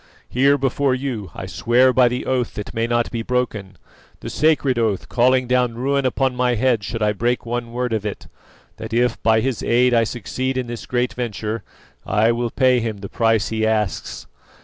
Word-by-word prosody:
Here 140 Hz, +3 st, +3 dB
before 135 Hz, 0 st, +1 dB
you 125 Hz, -8 st, -4 dB
I -, -, -6 dB
swear 125 Hz, +3 st, +3 dB
by 125 Hz, -1 st, +5 dB
the 125 Hz, +1 st, -2 dB
oath 125 Hz, -2 st, -1 dB
that 105 Hz, -, -6 dB
may 115 Hz, +1 st, 0 dB
not 120 Hz, 0 st, 0 dB
be 115 Hz, -, -3 dB
broken 115 Hz, -5 st, -2 dB, 0.4 s
the -, -, -6 dB
sacred 145 Hz, -5 st, +2 dB
oath, 110 Hz, -4 st, 0 dB
calling 130 Hz, +1 st, +3 dB
down 125 Hz, -2 st, +1 dB
ruin 135 Hz, +2 st, 0 dB
upon 130 Hz, 0 st, 0 dB
my 125 Hz, -1 st, +1 dB
head 120 Hz, -2 st, +1 dB
should 115 Hz, +2 st, -3 dB
I 105 Hz, -, +3 dB
break 120 Hz, +4 st, -1 dB
one 120 Hz, 0 st, -3 dB
word 125 Hz, 0 st, -2 dB
of 110 Hz, -2 st, -1 dB
it 105 Hz, -2 st, -5 dB, 0.5 s
that -, -, -7 dB
if 120 Hz, -1 st, +1 dB
by 110 Hz, 0 st, +3 dB
his 130 Hz, -2 st, -2 dB
aid 125 Hz, +1 st, +3 dB
I 115 Hz, -1 st, +4 dB
succeed 130 Hz, +4 st, -3 dB
in 130 Hz, -, -1 dB
this 120 Hz, -1 st, -7 dB
great 125 Hz, 0 st, 0 dB
venture, 115 Hz, -2 st, -4 dB, 0.4 s
I 105 Hz, +3 st, +2 dB
will 120 Hz, 0 st, -1 dB
pay 130 Hz, 0 st, +3 dB
him 110 Hz, -2 st, -3 dB
the 100 Hz, -, -7 dB
price 115 Hz, -2 st, +1 dB
he 110 Hz, -1 st, -2 dB
asks. 110 Hz, -3 st, -1 dB
120 Hz, 195 wpm, -21 LUFS, 115-125 Hz, 0.5 s, by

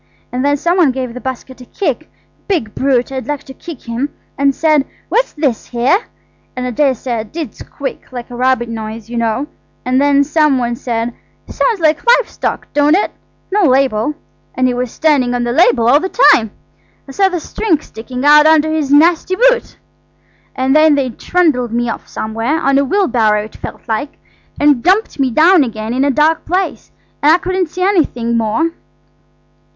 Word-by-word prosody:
And 250 Hz, +1 st, -2 dB
then 285 Hz, 0 st, +2 dB
some 345 Hz, +5 st, 0 dB
one 340 Hz, -6 st, +4 dB
gave 255 Hz, -2 st, -3 dB
the 250 Hz, -, -8 dB
basket 260 Hz, 0 st, -7 dB
a -, -, -11 dB
kick–big 310 Hz, -, -4 dB
brute, 265 Hz, -1 st, 0 dB
I'd 265 Hz, 0 st, -5 dB
like 295 Hz, -1 st, -3 dB
to 265 Hz, -, -11 dB
kick 325 Hz, -1 st, -10 dB
him!–and 275 Hz, +3 st, -3 dB
said, 310 Hz, -3 st, +2 dB, 0.3 s
'What's -, -, 0 dB
this 285 Hz, -7 st, -2 dB
here?' 255 Hz, -, +1 dB, 0.5 s
And 250 Hz, 0 st, -3 dB
I 250 Hz, -, -2 dB
daresay 255 Hz, -3 st, 0 dB
I -, -, -1 dB
did 280 Hz, +4 st, -6 dB
squeak–like 255 Hz, -3 st, -8 dB
a -, -, -7 dB
rabbit 255 Hz, -1 st, +1 dB
noise, 225 Hz, 0 st, -7 dB
you 240 Hz, -, -4 dB
know–and 255 Hz, +2 st, -3 dB
then 285 Hz, 0 st, +4 dB
some 300 Hz, -1 st, +2 dB
one 240 Hz, -1 st, -1 dB
said, 235 Hz, 0 st, -3 dB, 0.3 s
'Sounds 460 Hz, -5 st, 0 dB
like 315 Hz, -1 st, +1 dB
live -, -, +4 dB
stock, -, -, -4 dB
don't 295 Hz, +2 st, +3 dB
it? 400 Hz, -, 0 dB, 0.4 s
No 415 Hz, +2 st, +2 dB
label.' 265 Hz, -1 st, +1 dB, 0.4 s
And 255 Hz, -, +1 dB
he 250 Hz, -, +2 dB
was 250 Hz, 0 st, -2 dB
standing 265 Hz, -4 st, +1 dB
on 245 Hz, -, -1 dB
the 240 Hz, -, -1 dB
label 245 Hz, -5 st, +3 dB
all 275 Hz, +4 st, +5 dB
the 375 Hz, +4 st, -3 dB, 0.2 s
time. 225 Hz, -3 st, +2 dB, 0.6 s
I -, -, -9 dB
saw 385 Hz, +7 st, +2 dB
the 360 Hz, -2 st, -3 dB
string 335 Hz, 0 st, -1 dB
sticking 250 Hz, 0 st, -7 dB
out 300 Hz, +1 st, +7 dB
under 315 Hz, 0 st, +4 dB
his 300 Hz, -3 st, -1 dB
nasty 335 Hz, +5 st, +3 dB
boot. -, -, +2 dB, 0.8 s
And 260 Hz, +2 st, +1 dB
then 310 Hz, -1 st, +5 dB
they 265 Hz, -3 st, -1 dB
trundled 275 Hz, -5 st, 0 dB
me 240 Hz, 0 st, -1 dB
off -, -, -6 dB
somewhere, 225 Hz, +8 st, -2 dB
on 275 Hz, -2 st, +2 dB
a -, -, +2 dB
wheelbarrow 245 Hz, -, +1 dB
it 215 Hz, -, -12 dB
felt -, -, -8 dB
like, 260 Hz, +6 st, -3 dB, 0.4 s
and 290 Hz, -4 st, +3 dB
dumped 380 Hz, -, +1 dB
me 270 Hz, -1 st, +2 dB
down 320 Hz, +6 st, +5 dB
again 220 Hz, -2 st, -4 dB
in 260 Hz, +2 st, +1 dB
a 285 Hz, -, +2 dB
dark 305 Hz, +3 st, +2 dB
place–and 355 Hz, -4 st, -2 dB
I -, -, +5 dB
couldn't 370 Hz, -1 st, -2 dB
see 365 Hz, +3 st, -4 dB
anything 280 Hz, -, +1 dB
more." 230 Hz, +9 st, 0 dB
275 Hz, 180 wpm, -15 LUFS, 245-315 Hz, 0.8 s, out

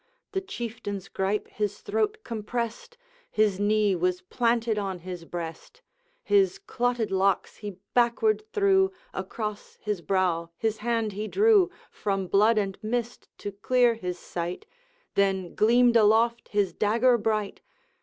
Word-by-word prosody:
The 385 Hz, -2 st, -1 dB
Chieftain's 225 Hz, -, -6 dB
gripe 195 Hz, +2 st, -1 dB
his 205 Hz, -1 st, -3 dB
throat 430 Hz, 0 st, 0 dB
compressed, 235 Hz, -, -4 dB, 0.3 s
His 210 Hz, -3 st, +2 dB
knee 205 Hz, -1 st, +3 dB
was 180 Hz, +1 st, 0 dB
planted 230 Hz, +1 st, 0 dB
on 195 Hz, -2 st, -3 dB
his 175 Hz, -1 st, -7 dB
breast; 175 Hz, -, -7 dB, 0.4 s
His 395 Hz, -4 st, +3 dB
clotted 245 Hz, -, -1 dB
locks 190 Hz, 0 st, +1 dB
he 205 Hz, -4 st, -7 dB, 0.2 s
backward 245 Hz, -, +2 dB
threw, 390 Hz, -3 st, +3 dB, 0.2 s
Across 210 Hz, +2 st, -5 dB
his 210 Hz, -4 st, -3 dB
brow 170 Hz, -1 st, 0 dB
his 220 Hz, -1 st, -1 dB
hand 225 Hz, -2 st, -1 dB
he 210 Hz, +2 st, -4 dB
drew, 405 Hz, -, +4 dB, 0.2 s
From 195 Hz, -2 st, -2 dB
blood 210 Hz, +5 st, +4 dB
and 195 Hz, -2 st, -1 dB
mist 235 Hz, +2 st, -3 dB
to 205 Hz, -, -5 dB
clear 240 Hz, +4 st, +3 dB
his 180 Hz, -5 st, -5 dB
sight, 175 Hz, 0 st, -5 dB, 0.5 s
Then 190 Hz, -3 st, +1 dB
gleamed 240 Hz, +2 st, +4 dB
aloft 230 Hz, +2 st, +4 dB
his 200 Hz, -4 st, +1 dB
dagger 230 Hz, +6 st, +3 dB
bright! 215 Hz, -1 st, -1 dB
215 Hz, 135 wpm, -27 LUFS, 195-240 Hz, 0.5 s, drew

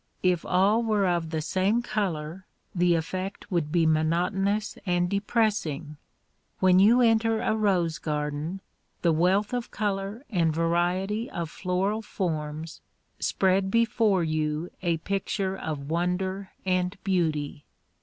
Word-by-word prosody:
If 180 Hz, -2 st, +2 dB
all 195 Hz, +5 st, +3 dB
were 215 Hz, -4 st, +1 dB
of 170 Hz, -2 st, 0 dB
the 160 Hz, -1 st, -2 dB
same 195 Hz, +8 st, +1 dB
color 185 Hz, -6 st, -3 dB, 0.3 s
the 175 Hz, -1 st, +3 dB
effect 185 Hz, +5 st, -4 dB
would 165 Hz, -4 st, 0 dB
be 170 Hz, -1 st, +3 dB
monotonous 180 Hz, +7 st, +1 dB
and 175 Hz, -2 st, +1 dB
depressing. 200 Hz, -, -1 dB, 0.6 s
When 185 Hz, -1 st, +5 dB
you 230 Hz, +6 st, +6 dB
enter 225 Hz, -1 st, +3 dB
a 220 Hz, -, +1 dB
rose 185 Hz, -7 st, +1 dB
garden 150 Hz, +4 st, -3 dB, 0.4 s
the 170 Hz, -, +4 dB
wealth 185 Hz, +8 st, +2 dB
of 245 Hz, -1 st, -2 dB
color 205 Hz, +4 st, -3 dB
and 170 Hz, -5 st, +2 dB
variety 175 Hz, +7 st, 0 dB
of 165 Hz, -2 st, -4 dB
floral 195 Hz, +4 st, -1 dB
forms 160 Hz, -6 st, -4 dB, 0.4 s
spread 190 Hz, 0 st, +1 dB
before 225 Hz, -4 st, +2 dB
you 155 Hz, +1 st, -1 dB
a 170 Hz, -3 st, +1 dB
picture 195 Hz, +2 st, -2 dB
of 150 Hz, -5 st, -5 dB
wonder 185 Hz, +3 st, -1 dB, 0.2 s
and 185 Hz, 0 st, 0 dB
beauty. 155 Hz, -6 st, -1 dB
185 Hz, 125 wpm, -27 LUFS, 165-200 Hz, 0.6 s, you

